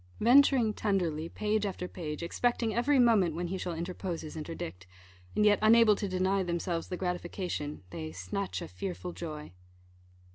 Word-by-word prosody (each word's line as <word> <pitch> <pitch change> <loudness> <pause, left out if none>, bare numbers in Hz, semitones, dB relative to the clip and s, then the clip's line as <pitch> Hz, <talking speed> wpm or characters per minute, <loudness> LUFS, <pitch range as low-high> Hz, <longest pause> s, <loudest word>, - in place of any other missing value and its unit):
Venturing 245 -2 +5
tenderly, 170 -7 -1
page 215 +2 0
after 190 -3 -3
page, 155 -3 -5
expecting 230 +5 0
every 270 +4 +2
moment 215 -10 +4
when 175 +1 -3
he 190 - -2
shall 175 -2 -3
interpose 175 0 -4
his 155 - -8
interdict, 95 - -6 0.5
and 210 - +3
yet 205 -1 +5
unable 220 -1 +6
to 200 - -3
deny 185 +1 +1
themselves 170 -1 -2
the 180 - -4
gratification, 175 - -3
they 80 -3 -5
"snatch 90 - -4
a - - -6
fearful 180 -2 -5
joy." 155 - -7
180 Hz, 155 wpm, -30 LUFS, 165-210 Hz, 0.5 s, unable